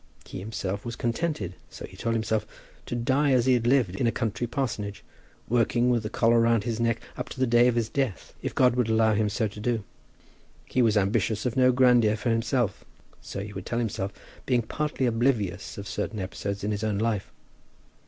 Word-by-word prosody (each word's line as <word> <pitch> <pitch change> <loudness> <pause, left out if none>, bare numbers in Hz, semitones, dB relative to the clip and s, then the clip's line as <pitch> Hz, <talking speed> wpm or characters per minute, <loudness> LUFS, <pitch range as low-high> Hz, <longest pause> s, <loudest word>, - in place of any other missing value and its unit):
He - - -7
himself 100 0 -4
was 120 -1 -5
contented, 120 - -2 0.2
so - - -8
he - - -14
told 115 0 -1
himself, 110 -1 0 0.4
to - - -3
die 135 +4 +2
as 125 -2 +3
he 130 - +5
had 120 -1 +1
lived 120 -8 +3
in 120 - +1
a - - +3
country 115 0 -2
parsonage, 110 -6 -3 0.4
working 120 +1 +2
with 120 -2 +2
the 105 - -4
collar 115 +1 +3
round 115 -2 +3
his 115 -1 -2
neck 115 -1 +1 0.2
up - - -4
to - - -9
the 130 - +3
day 120 0 +5
of 125 - +2
his 115 -2 +1
death, 130 -6 -2
if - - -4
God 125 -2 +4
would 125 -3 +1
allow 110 0 +4
him 105 0 +1
so 110 +2 0
to 105 +1 -10
do. 115 -1 -1 0.8
He 130 - 0
was 110 -3 +3
ambitious 105 +2 +1
of 125 - -1
no 130 -1 +5
grandeur 120 -4 +4
for 115 +2 -1
himself. 115 0 0 0.4
So 100 - -6
he 105 0 -7
would 95 -2 -7
tell 120 - -2
himself, 110 -4 -2 0.4
being 125 -2 +2
partly 150 +3 -2
oblivious 115 -6 0
of 100 0 -6
certain 110 - -3
episodes 100 +1 -4
in 105 - 0
his 105 0 -2
own 105 -2 0
life. 110 -2 -1
115 Hz, 210 wpm, -27 LUFS, 105-120 Hz, 0.8 s, he